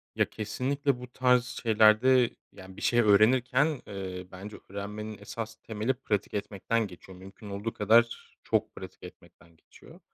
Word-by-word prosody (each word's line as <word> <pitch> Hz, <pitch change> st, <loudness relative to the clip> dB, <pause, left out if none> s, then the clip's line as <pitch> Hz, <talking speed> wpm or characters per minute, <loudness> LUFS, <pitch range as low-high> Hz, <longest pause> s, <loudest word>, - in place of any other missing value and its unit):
Ya -, -, +3 dB
kesinlikle 130 Hz, +5 st, -1 dB
bu 125 Hz, -, -8 dB
tarz 125 Hz, -1 st, +3 dB, 0.2 s
şeylerde, 115 Hz, +3 st, +5 dB, 0.2 s
yani 95 Hz, 0 st, -13 dB
bir -, -, -9 dB
şey 120 Hz, -, +2 dB
öğrenirken, 125 Hz, +7 st, +4 dB
eee, 95 Hz, -2 st, -6 dB
bence 100 Hz, +3 st, -9 dB
öğrenmenin 105 Hz, +2 st, -6 dB
esas 110 Hz, +2 st, -7 dB
temeli 110 Hz, +3 st, -1 dB
pratik 105 Hz, -6 st, -2 dB
etmekten 105 Hz, +2 st, -1 dB
geçiyor. 95 Hz, 0 st, -13 dB
Mümkün 95 Hz, +3 st, -12 dB
olduğu 100 Hz, +3 st, -4 dB
kadar 115 Hz, +3 st, +2 dB
çok -, -, -1 dB
pratik -, -, -10 dB
etmekten 85 Hz, -1 st, -15 dB
geçiyor. -, -, -17 dB
110 Hz, 140 wpm, -28 LUFS, 100-120 Hz, 0.2 s, şeylerde